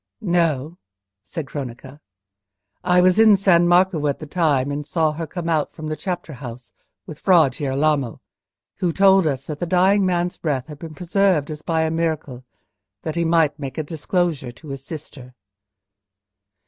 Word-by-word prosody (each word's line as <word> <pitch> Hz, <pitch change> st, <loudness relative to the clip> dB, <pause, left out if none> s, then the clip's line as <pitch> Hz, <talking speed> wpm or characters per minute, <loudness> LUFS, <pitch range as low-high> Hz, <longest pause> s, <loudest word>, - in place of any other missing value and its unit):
"No," 170 Hz, -, 0 dB, 0.4 s
said 140 Hz, +9 st, -6 dB
Cronaca; 130 Hz, 0 st, -8 dB, 0.8 s
"I 180 Hz, 0 st, +4 dB
was 185 Hz, +3 st, +4 dB
in 220 Hz, -2 st, +7 dB
San 175 Hz, -3 st, +4 dB
Marco 175 Hz, -3 st, +3 dB
at 140 Hz, -, 0 dB
the 155 Hz, -, -8 dB
time, 145 Hz, -4 st, +1 dB
and 145 Hz, +1 st, -3 dB
saw 155 Hz, +1 st, 0 dB
her 160 Hz, +1 st, -5 dB
come 175 Hz, -1 st, -5 dB
out 155 Hz, -3 st, 0 dB
from 155 Hz, -1 st, -6 dB
the 155 Hz, -, -2 dB
chapter 175 Hz, -3 st, -5 dB
house 125 Hz, -2 st, -9 dB, 0.3 s
with 150 Hz, -, -10 dB
Fra 170 Hz, -8 st, +4 dB
Girolamo, 140 Hz, -2 st, -1 dB, 0.6 s
who 180 Hz, -2 st, 0 dB
told 195 Hz, -1 st, +5 dB
us 135 Hz, -2 st, -2 dB
that 150 Hz, -2 st, -6 dB
the 175 Hz, -, -2 dB
dying 190 Hz, +3 st, +3 dB
man's 180 Hz, -1 st, 0 dB
breath 140 Hz, -6 st, -2 dB
had 150 Hz, 0 st, -11 dB
been 160 Hz, -1 st, -9 dB
preserved 180 Hz, -2 st, +1 dB
as 150 Hz, -1 st, -7 dB
by 160 Hz, 0 st, 0 dB
a 160 Hz, -, 0 dB
miracle, 160 Hz, -6 st, -2 dB, 0.6 s
that 160 Hz, -, -3 dB
he 170 Hz, -, +1 dB
might 160 Hz, -3 st, +2 dB
make 135 Hz, 0 st, -6 dB
a 155 Hz, -, -1 dB
disclosure 160 Hz, -3 st, -2 dB
to 145 Hz, +5 st, -14 dB
his 135 Hz, -1 st, -6 dB
sister." 135 Hz, -5 st, -9 dB
160 Hz, 170 wpm, -21 LUFS, 140-175 Hz, 0.8 s, in